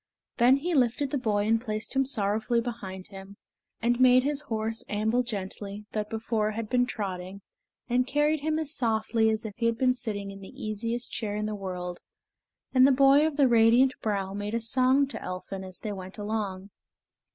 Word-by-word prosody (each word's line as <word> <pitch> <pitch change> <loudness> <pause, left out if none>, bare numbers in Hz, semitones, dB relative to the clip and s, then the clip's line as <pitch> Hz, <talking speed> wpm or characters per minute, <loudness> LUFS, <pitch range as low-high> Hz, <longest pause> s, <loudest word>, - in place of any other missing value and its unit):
Then 245 +2 +6
he 335 +6 -2
lifted 265 0 +1
the 285 - 0
boy 205 -4 0
and 225 +1 +2
placed 215 +1 -4
him 270 -1 +3
sorrowfully 220 0 0
behind 205 -6 -6
him; 195 0 -11 0.5
and 240 +1 +2
made 255 0 +6
his 290 +1 0
horse 225 -4 -3
amble 220 +4 +1
gently, 205 -2 -5
that 210 -1 -3
before 220 -1 -1
had 220 0 -4
been 245 -1 +3
trotting, 195 -3 -5 0.5
and 250 +1 +1
carried 295 +3 +2
him 310 +2 -1
as 315 -3 -2
softly 220 -1 +1
as 220 0 -1
if 215 - -5
he 230 -1 +1
had 230 -1 0
been 255 +1 +3
sitting 210 -5 -5
in 195 - -10
the 190 - -12
easiest 230 +3 -3
chair 205 -3 -3
in 210 0 -2
the 215 - -3
world, 180 -3 -5 0.7
and 260 0 +7
the - - +5
boy 275 +3 +5
of 300 -2 -4
the 280 -2 +5
radiant 240 +3 +5
brow 195 -3 -2
made 205 +2 -3
a - - +1
song 255 +4 +3
to 275 - -8
Elphin 185 +1 -6
as 185 -1 -8
they 215 - -4
went 190 0 -8
along. 205 -2 -4
225 Hz, 195 wpm, -27 LUFS, 205-255 Hz, 0.7 s, and